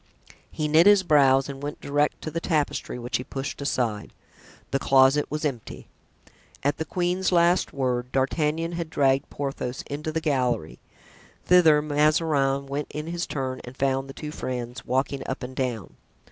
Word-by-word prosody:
He 155 Hz, -, -2 dB
knit 160 Hz, +5 st, +5 dB
his 205 Hz, -2 st, +6 dB
brows 135 Hz, -5 st, +4 dB
and 140 Hz, -1 st, -7 dB
went 145 Hz, +1 st, -5 dB
direct 145 Hz, +1 st, 0 dB
to 155 Hz, -, -4 dB
the 165 Hz, -, -2 dB
tapestry, 155 Hz, -7 st, -1 dB
which 120 Hz, 0 st, -2 dB
he 125 Hz, -, -6 dB
pushed 135 Hz, +2 st, -5 dB
aside. 120 Hz, -7 st, -2 dB, 0.6 s
The 135 Hz, -, +1 dB
closet 135 Hz, +2 st, +4 dB
was 150 Hz, +1 st, -3 dB
empty. 125 Hz, -7 st, -5 dB, 0.7 s
At 145 Hz, +1 st, +1 dB
the 160 Hz, -, -3 dB
queen's 180 Hz, +3 st, 0 dB
last 175 Hz, 0 st, +3 dB
word, 125 Hz, -2 st, -2 dB
D'Artagnan 150 Hz, +5 st, 0 dB
had 170 Hz, -2 st, -4 dB
dragged 135 Hz, -2 st, +1 dB
Porthos 135 Hz, -3 st, -4 dB
into 150 Hz, +2 st, -5 dB
the 160 Hz, -, -1 dB
gallery. 125 Hz, -, -1 dB, 0.7 s
Thither 160 Hz, -5 st, +5 dB
Mazarin 150 Hz, -2 st, +2 dB
went 140 Hz, +1 st, -4 dB
in 150 Hz, 0 st, -5 dB
his 170 Hz, +1 st, -3 dB
turn 130 Hz, -2 st, -3 dB
and 125 Hz, +2 st, -11 dB
found 135 Hz, 0 st, 0 dB
the -, -, -7 dB
two 150 Hz, +1 st, -7 dB
friends 125 Hz, -4 st, -5 dB
walking 135 Hz, +2 st, 0 dB
up 130 Hz, -, -4 dB
and 130 Hz, +1 st, -7 dB
down. 125 Hz, -6 st, -3 dB
140 Hz, 165 wpm, -25 LUFS, 130-155 Hz, 0.7 s, his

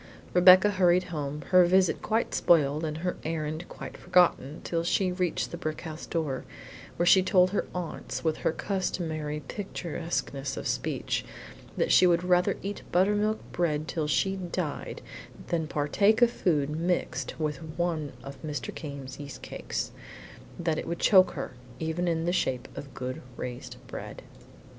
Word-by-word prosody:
Rebecca 185 Hz, +3 st, +8 dB
hurried 180 Hz, -2 st, +4 dB
home, 150 Hz, -1 st, -3 dB
her 185 Hz, -1 st, +8 dB
visit 185 Hz, +1 st, +3 dB
quite 225 Hz, +1 st, 0 dB
spoiled 150 Hz, -2 st, +3 dB
and 155 Hz, -1 st, -2 dB
her 180 Hz, -, -1 dB
errand 155 Hz, +1 st, -3 dB
quite -, -, -8 dB
forgotten 165 Hz, -5 st, +2 dB
till 165 Hz, -1 st, -1 dB
she 180 Hz, +2 st, +1 dB
reached 180 Hz, -2 st, -1 dB
the -, -, -5 dB
brick 155 Hz, 0 st, -4 dB
house 160 Hz, -1 st, -7 dB
door, 150 Hz, -6 st, -2 dB, 0.5 s
where 175 Hz, -, +1 dB
she 190 Hz, +2 st, +7 dB
told 185 Hz, -1 st, +4 dB
her 205 Hz, -, -1 dB
aunts, 180 Hz, -2 st, -4 dB
with 160 Hz, -2 st, +1 dB
her -, -, +1 dB
customary 160 Hz, -5 st, -2 dB
picturesqueness 165 Hz, -5 st, -4 dB
of -, -, -5 dB
speech, -, -, -1 dB, 0.5 s
that -, -, +1 dB
she 185 Hz, -, +7 dB
would 175 Hz, 0 st, +3 dB
rather 180 Hz, 0 st, +3 dB
eat 200 Hz, +1 st, -4 dB
buttermilk 210 Hz, +4 st, +3 dB
bread 155 Hz, -3 st, 0 dB
till 160 Hz, -3 st, -2 dB
she 190 Hz, +6 st, +1 dB
died 175 Hz, -4 st, -4 dB, 0.5 s
than 165 Hz, -2 st, 0 dB
partake 200 Hz, +11 st, +3 dB
of 235 Hz, -, +5 dB
food 150 Hz, -9 st, +1 dB
mixed 160 Hz, -5 st, -2 dB
with 150 Hz, -2 st, -1 dB, 0.2 s
one 165 Hz, -4 st, -1 dB
of 140 Hz, 0 st, -9 dB
Mr. 150 Hz, -3 st, -4 dB
Came's 140 Hz, -3 st, -7 dB
yeast 145 Hz, -1 st, -8 dB
cakes; -, -, -4 dB, 0.7 s
that 165 Hz, -2 st, 0 dB
it -, -, -6 dB
would 170 Hz, +1 st, -2 dB
choke 185 Hz, -1 st, +5 dB
her, 135 Hz, -, -5 dB, 0.3 s
even 160 Hz, +2 st, -1 dB
in 165 Hz, -1 st, 0 dB
the 175 Hz, -, +1 dB
shape 130 Hz, -8 st, 0 dB
of 140 Hz, -, -8 dB
good 130 Hz, 0 st, -4 dB, 0.2 s
raised 125 Hz, -1 st, -6 dB
bread. -, -, -8 dB
165 Hz, 155 wpm, -28 LUFS, 150-180 Hz, 0.7 s, Rebecca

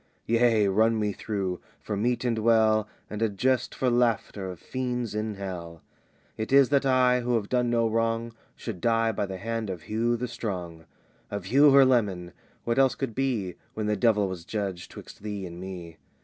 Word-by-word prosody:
"Yea, 115 Hz, -2 st, +3 dB
run 110 Hz, +3 st, +3 dB
me 105 Hz, -1 st, 0 dB
through! 95 Hz, -5 st, -3 dB, 0.2 s
for 105 Hz, -, -4 dB
meet 120 Hz, +5 st, 0 dB
and 115 Hz, -2 st, 0 dB
well, 110 Hz, -1 st, +3 dB, 0.2 s
And 105 Hz, +1 st, -6 dB
a 115 Hz, -, +3 dB
jest 125 Hz, +5 st, 0 dB
for 130 Hz, -, 0 dB
laughter 115 Hz, -5 st, +1 dB
of 90 Hz, -3 st, -8 dB
fiends 125 Hz, -1 st, -3 dB
in 105 Hz, 0 st, -2 dB
Hell, 85 Hz, -4 st, -7 dB, 0.5 s
"It 110 Hz, +2 st, -4 dB
is 140 Hz, -2 st, +6 dB
that 140 Hz, -1 st, +2 dB
I, 125 Hz, -1 st, +4 dB
who 120 Hz, 0 st, 0 dB
have 105 Hz, -3 st, -1 dB
done 125 Hz, -1 st, +1 dB
no 115 Hz, -1 st, +2 dB
wrong, 115 Hz, +1 st, -1 dB, 0.2 s
Should 105 Hz, -7 st, -7 dB
die 115 Hz, -1 st, +2 dB
by 100 Hz, -1 st, -2 dB
the 95 Hz, -1 st, -5 dB
hand 115 Hz, +1 st, -3 dB
of 90 Hz, -4 st, -5 dB
Hugh 115 Hz, +2 st, 0 dB
the 125 Hz, +2 st, -3 dB
Strong, 90 Hz, -8 st, -5 dB, 0.4 s
"Of 100 Hz, -3 st, -5 dB
Hugh 140 Hz, +8 st, +6 dB
her 135 Hz, -1 st, +8 dB
leman! 100 Hz, -9 st, +1 dB, 0.3 s
What 115 Hz, +3 st, 0 dB
else 135 Hz, -1 st, +4 dB
could 135 Hz, -5 st, -3 dB
be 115 Hz, -8 st, -1 dB, 0.2 s
When 110 Hz, -, -2 dB
the 105 Hz, 0 st, +1 dB
devil 105 Hz, -1 st, +3 dB
was 95 Hz, -3 st, -6 dB
judge 95 Hz, -2 st, -4 dB
'twixt -, -, -12 dB
thee 105 Hz, -2 st, -5 dB
and 85 Hz, -1 st, -8 dB
me? 90 Hz, -3 st, -8 dB
110 Hz, 190 wpm, -27 LUFS, 100-120 Hz, 0.5 s, her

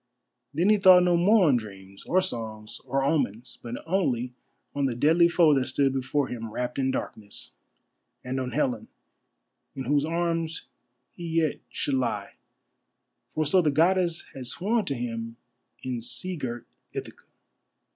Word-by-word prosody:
Then 170 Hz, +7 st, +2 dB
he 215 Hz, -, +6 dB
thought 185 Hz, -2 st, +8 dB
no 175 Hz, -1 st, +3 dB
more 190 Hz, +2 st, +5 dB
on 135 Hz, -4 st, +5 dB
dreams, 100 Hz, -3 st, -9 dB
or 185 Hz, +2 st, +3 dB
songs, 110 Hz, -10 st, -4 dB
or 135 Hz, +1 st, 0 dB
omens, 130 Hz, -5 st, -1 dB
but 120 Hz, 0 st, -6 dB
only 130 Hz, -9 st, 0 dB, 0.4 s
on 140 Hz, -1 st, 0 dB
the 130 Hz, -3 st, 0 dB
deadly 160 Hz, +7 st, +5 dB
foe 170 Hz, -3 st, +5 dB
that 135 Hz, -2 st, +2 dB
stood 135 Hz, 0 st, +2 dB
before 135 Hz, +1 st, 0 dB
him 115 Hz, -2 st, -5 dB
wrapped 125 Hz, +4 st, -3 dB
in 130 Hz, -1 st, +1 dB
darkness, 110 Hz, -5 st, -5 dB, 0.7 s
and 130 Hz, +1 st, -3 dB
on 130 Hz, -1 st, -2 dB
Helen, 125 Hz, -4 st, -1 dB, 0.9 s
in 135 Hz, -, -4 dB
whose 145 Hz, +3 st, +2 dB
arms 165 Hz, 0 st, -1 dB, 0.5 s
he 175 Hz, -, -7 dB
yet 165 Hz, -2 st, +1 dB
should 145 Hz, -, -2 dB
lie, 120 Hz, -6 st, -1 dB, 1.0 s
for 155 Hz, -, -1 dB
so 180 Hz, +6 st, +4 dB
the 155 Hz, -, +2 dB
Goddess 170 Hz, +3 st, +2 dB
had 130 Hz, -2 st, -7 dB
sworn 210 Hz, -, 0 dB
to 140 Hz, -, -2 dB
him 115 Hz, -1 st, -4 dB, 0.5 s
in 125 Hz, -2 st, -3 dB
sea 185 Hz, +10 st, -4 dB
girt 120 Hz, -6 st, -5 dB, 0.3 s
Ithaca. -, -, -7 dB
135 Hz, 155 wpm, -27 LUFS, 120-170 Hz, 1.0 s, thought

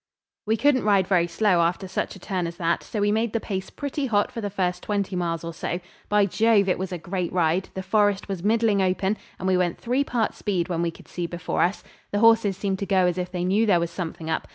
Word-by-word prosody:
We 220 Hz, +1 st, +2 dB
couldn't 270 Hz, +2 st, +3 dB
ride 200 Hz, -3 st, +3 dB
very 180 Hz, -2 st, +2 dB
slow 180 Hz, +1 st, +2 dB
after 175 Hz, +3 st, 0 dB
such 185 Hz, -, -3 dB
a -, -, -12 dB
turn 180 Hz, -2 st, -2 dB
as 170 Hz, 0 st, -7 dB
that, 170 Hz, -1 st, 0 dB
so 215 Hz, -, -5 dB
we 205 Hz, 0 st, +3 dB
made 220 Hz, +1 st, 0 dB
the 230 Hz, -, +1 dB
pace 190 Hz, -3 st, -4 dB
pretty 285 Hz, 0 st, -3 dB
hot 205 Hz, -3 st, +1 dB
for 230 Hz, -, -5 dB
the 205 Hz, -, -2 dB
first 180 Hz, -2 st, -1 dB
twenty 200 Hz, -2 st, -2 dB
miles 170 Hz, -2 st, -2 dB
or 170 Hz, 0 st, -5 dB
so. 175 Hz, +2 st, -3 dB, 0.3 s
By 210 Hz, -1 st, +4 dB
Jove! 215 Hz, 0 st, +3 dB
it 180 Hz, -, +1 dB
was 190 Hz, 0 st, -3 dB
a 180 Hz, -, -3 dB
great 175 Hz, +1 st, -3 dB
ride; 175 Hz, +1 st, +1 dB
the 190 Hz, -, -4 dB
forest 205 Hz, 0 st, +2 dB
was 195 Hz, -3 st, -4 dB
middling 220 Hz, -1 st, +3 dB
open, 190 Hz, +2 st, +1 dB, 0.2 s
and 185 Hz, -, -4 dB
we 185 Hz, -1 st, +3 dB
went 175 Hz, -2 st, 0 dB
three 250 Hz, +4 st, 0 dB
parts 240 Hz, -5 st, -1 dB
speed 185 Hz, -4 st, -1 dB
when 170 Hz, -2 st, -1 dB
we 170 Hz, -, +1 dB
could 165 Hz, -, -13 dB
see 175 Hz, -1 st, -4 dB
before 175 Hz, 0 st, -2 dB
us. 185 Hz, +4 st, +1 dB, 0.3 s
The 205 Hz, -, -1 dB
horses 225 Hz, -3 st, +4 dB
seemed 195 Hz, -1 st, -2 dB
to 200 Hz, -, -3 dB
go 190 Hz, -1 st, +3 dB
as 180 Hz, 0 st, 0 dB
if 180 Hz, 0 st, -3 dB
they 180 Hz, -1 st, -2 dB
knew 200 Hz, +5 st, +2 dB
there 180 Hz, -4 st, +4 dB
was 170 Hz, 0 st, -2 dB
something 165 Hz, -3 st, -5 dB
up. 160 Hz, -, -2 dB
190 Hz, 255 wpm, -25 LUFS, 175-210 Hz, 0.3 s, By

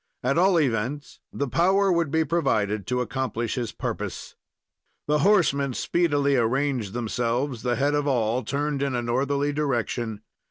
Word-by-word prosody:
At 130 Hz, +3 st, +1 dB
all 180 Hz, 0 st, +4 dB
events, 135 Hz, +1 st, -2 dB
the 140 Hz, -, -2 dB
power 190 Hz, +7 st, +3 dB
would 170 Hz, -3 st, +1 dB
be 160 Hz, +2 st, +1 dB
provided 110 Hz, -, 0 dB
to 125 Hz, 0 st, 0 dB
accomplish 120 Hz, -1 st, -2 dB
his 120 Hz, -4 st, -3 dB
purpose. -, -, -5 dB, 0.7 s
The 150 Hz, 0 st, +1 dB
horsemen 140 Hz, -, +3 dB
speedily 145 Hz, -5 st, +1 dB
arranged 125 Hz, -3 st, 0 dB
themselves; 120 Hz, +2 st, -2 dB
the 125 Hz, -1 st, 0 dB
head 140 Hz, +3 st, +1 dB
of 145 Hz, 0 st, 0 dB
all 120 Hz, -2 st, +1 dB
turned 145 Hz, +1 st, -2 dB
in 140 Hz, -2 st, 0 dB
a 120 Hz, -, -1 dB
northerly 140 Hz, +4 st, 0 dB
direction. 120 Hz, -6 st, -2 dB
135 Hz, 150 wpm, -25 LUFS, 120-145 Hz, 0.7 s, all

